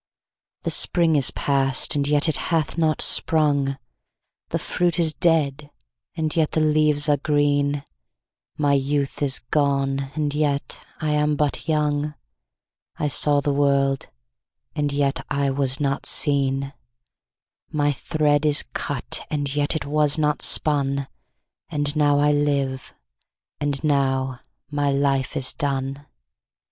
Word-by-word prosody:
7The - - -1
spring 165 -3 +3
is 140 -3 +3
past, 135 -1 +1
and 140 -1 0
yet 145 +2 +2
it 160 - +2
hath 160 -3 0
not 160 -2 +1
sprung,8The 140 -3 -1
fruit 175 -1 -1
is 165 -3 +2
dead, 150 -4 0 0.5
and 155 -1 -2
yet 160 -2 +1
the - - +1
leaves 150 -1 +2
are 145 -1 +3
green,9My 145 - -2
youth 140 0 -2
is 140 -2 +2
gone, 140 -2 0
and 150 -2 -1
yet 145 -1 -2 0.2
I 155 -1 -1
am 150 0 +1
but 145 -1 -2
young,10I 145 - -4
saw 145 +1 +3
the 145 0 -1
world, 140 -1 +1 0.7
and 145 -2 -1
yet 140 -1 -1
I 140 -1 0
was 135 -1 +1
not 140 -1 -1
seen,11My 135 +1 -2
thread 150 0 0
is 150 -1 +3
cut, - - -2
and 145 -2 -2
yet 145 +2 +1
it 155 - -3
was 150 0 +2
not 150 -1 0
spun,12And 145 +1 -1
now 145 -1 +3
I 145 +1 +3
live, 140 -3 -1 0.7
and 145 -1 -2
now 135 -3 0 0.3
my 145 -1 0
life 140 -1 0
is 130 - +2
done. 140 0 -3
145 Hz, 125 wpm, -22 LUFS, 140-150 Hz, 0.7 s, spring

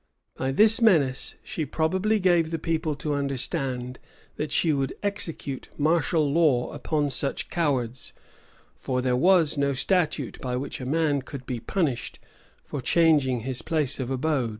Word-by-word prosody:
[*] - - -52
By 130 0 -2
this 215 - +5
menace, 150 - +2
she 205 -7 -4
probably 185 +9 0
gave 175 -4 +3
the 165 - -2
people 160 -1 -1
to 145 +1 -3
understand, 135 -2 -2 0.4
that 150 -1 -4
she 160 +1 +3
would 135 -2 -1
execute 165 -9 -4
martial 160 0 +2
law 145 -7 +2
upon 150 -3 -1
such 135 +2 -2
cowards; 130 -7 -1 0.6
for 125 -1 -2
there 125 -1 +1
was 165 0 +4
no 140 0 +1
statute 170 +4 0
by 125 -2 -2
which 135 +1 -4
a 125 - -5
man 150 -1 +1
could 130 0 -9
be 125 -2 -4
punished 145 -3 -2 0.5
for 145 - -5
changing 145 -5 +3
his 130 +1 -3
place 150 -5 -1
of 130 -2 -3
abode. 135 -2 0
145 Hz, 155 wpm, -26 LUFS, 130-165 Hz, 0.6 s, this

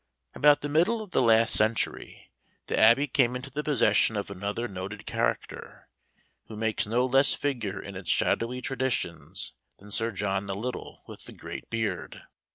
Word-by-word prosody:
About 145 0 +4
the 145 - -3
middle 180 +10 +2
of 205 - -14
the - - +2
last 115 -1 +5
century, 110 +1 0 0.3
the - - -2
Abbey 115 +6 +6
came 125 -3 +2
into 130 +2 -6
the 145 +3 -2
possession 110 -7 +3
of 100 0 -4
another 100 +5 -3
noted 95 -2 -7
character, - - -3 0.6
who 110 - -9
makes 110 -1 0
no 120 +4 +2
less 135 +2 +4
figure 115 -9 -3
in 100 0 -8
its 95 -1 -7
shadowy 125 +2 +1
traditions 130 -10 -3 0.2
than 105 +1 -15
Sir 115 +2 -1
John 100 -1 -2
the 95 - -2
Little 120 +5 -6
with - - -11
the - - -10
great - - -8
Beard. 110 -5 -3
115 Hz, 165 wpm, -27 LUFS, 100-135 Hz, 0.6 s, Abbey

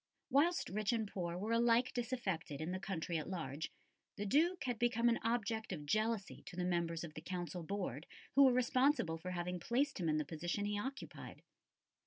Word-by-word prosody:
Whilst 335 +6 +3
rich 210 +3 0
and 220 -2 0
poor 175 -3 -3
were 210 +5 -2
alike 235 +1 +4
disaffected 220 - -2
in 160 +3 -2
the 185 - -2
country 175 -3 -2
at 155 - -5
large, 160 -5 -3 0.4
the 205 - -3
Duke 320 - +3
had 245 -4 -2
become 240 0 +3
an 235 - +2
object 225 -1 -1
of 150 -5 -4
jealousy 215 +3 0
to 180 - -7
the 180 0 -1
members 170 -2 0
of 160 -3 -7
the - - -7
Council 180 -1 -4
Board 165 -5 -3 0.3
who 275 0 +8
were 260 - +7
responsible 255 - +3
for 180 +3 -5
having 180 0 -2
placed 265 +5 +1
him 170 -3 +1
in 155 - +2
the 150 - 0
position 175 +6 -2
he 205 0 -1
occupied. 270 +6 -6
200 Hz, 195 wpm, -37 LUFS, 170-240 Hz, 0.4 s, who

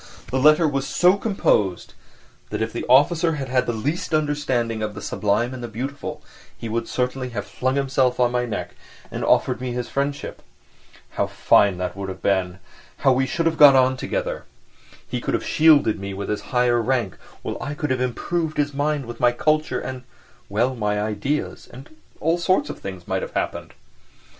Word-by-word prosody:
The 130 - +1
letter 155 +4 +5
was 135 -2 -1
so 180 +2 +4
composed 110 - 0 0.6
that - - -3
if 110 0 -2
the 120 - -4
officer 160 +6 +4
had 135 -3 -4
had 125 0 +1
the - - +1
least 145 +9 -2
understanding 140 -7 0
of 105 -1 -3
the - - -6
sublime 110 +4 0
and 130 - -7
the 120 - -4
beautiful 130 +6 -6 0.3
he 115 - -6
would 115 +1 -2
certainly 125 0 -2
have 105 - -2
flung 130 +1 -2
himself 135 -2 +1
on 120 -1 +3
my 125 0 0
neck 110 - -4 0.4
and - - -4
have - - 0
offered 115 - +2
me 125 -1 -3
his 125 -1 -4
friendship. 140 +1 -3 0.7
And - - -20
how - - +1
fine 100 -3 +3
that 90 0 -3
would 100 -1 -5
have 95 0 -8
been! 95 -2 +1 0.5
How 135 - +7
we 135 +1 +1
should 165 +5 -1
have 165 -1 0
got 145 -2 +9
on 130 0 +4
together! - - -3 0.6
"He - - -3
could - - -1
have - - -3
shielded 150 -9 +4
me 100 0 -5
with 100 +1 -5
his 105 -1 -1
higher 125 -2 +2
rank, 120 -5 0 0.3
while - - -4
I 145 - -4
could 150 -2 -2
have 130 -1 0
improved 155 +6 -2
his 145 0 0
mind 145 0 -1
with 120 0 -8
my 120 0 +4
culture, 155 +5 0
and, 130 -1 -6 0.5
well... 120 +6 +1
my 105 -3 -1
ideas, 110 +8 -3
and 135 +5 -13 0.2
all 165 +3 +1
sorts 170 -4 +1
of - - -10
things 95 -3 -8
might 95 0 -1
have - - -6
happened." - - -3
130 Hz, 195 wpm, -23 LUFS, 110-145 Hz, 0.7 s, got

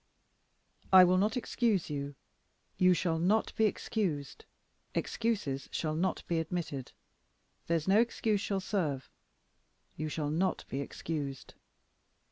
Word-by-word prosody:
"I 190 -1 +10
will 180 +1 +4
not 210 +6 +1
excuse 225 -8 0
you; 140 -1 -4 0.6
you 185 0 +6
shall 165 -2 0
not 205 +6 +2
be 220 - +3
excused; 185 -9 -2 0.5
excuses 205 -13 -1
shall 155 -2 -1
not 175 +4 -1
be 170 -1 0
admitted; 160 -5 -4 0.8
there's 165 -1 0
no 200 +3 +5
excuse 225 -3 +1
shall 195 -2 -1
serve; 155 - -2 0.8
you 155 +1 -3
shall 150 -1 -2
not 180 +5 0
be 135 - -2
excused." 140 -1 -5
175 Hz, 120 wpm, -32 LUFS, 150-200 Hz, 0.8 s, I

